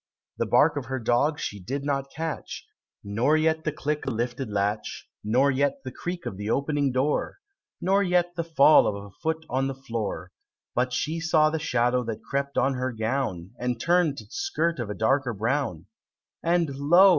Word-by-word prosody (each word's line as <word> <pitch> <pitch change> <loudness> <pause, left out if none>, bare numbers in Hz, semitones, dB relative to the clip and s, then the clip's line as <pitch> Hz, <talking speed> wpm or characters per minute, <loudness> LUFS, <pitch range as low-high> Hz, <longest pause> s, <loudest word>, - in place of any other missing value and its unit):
The - - +1
bark 150 -1 +4
of 140 - -3
her 130 +2 -3
dog 130 +6 +1
she 105 - -4
did 135 +9 -4
not 135 -1 -1
catch; 160 +2 -5 0.4
Nor 115 +10 +2
yet 160 0 +1
the 155 - +1
click 150 0 -2
of 130 - 0
the - - -4
lifted 120 +1 -2
latch; 105 +1 -2 0.2
Nor 130 +6 +3
yet 140 0 0
the 130 - -5
creak 175 +5 -5
of 95 - -4
the 105 +1 -4
opening 140 +2 +1
door; 130 +4 0 0.4
Nor 195 +3 +3
yet 180 -2 +2
the 170 - -1
fall 155 -2 +6
of 105 - 0
a 100 0 -9
foot 160 0 -1
on 135 +1 0
the 135 - -3
floor 115 -5 -4 0.4
But 125 +1 +1
she 155 +6 -1
saw 155 -2 +3
the 160 - -1
shadow 125 -3 +1
that 110 -1 -5
crept 140 0 -2
on 135 - +3
her 130 0 -2
gown 110 -6 -2
And 125 -1 -1
turn'd 170 -2 +2
its - - -10
skirt 170 - 0
of 115 -4 -3
a 105 - -3
darker 130 +2 +1
brown. 115 - -1 0.6
And 170 -4 +1
lo! 175 +8 +6
135 Hz, 190 wpm, -26 LUFS, 120-155 Hz, 0.6 s, fall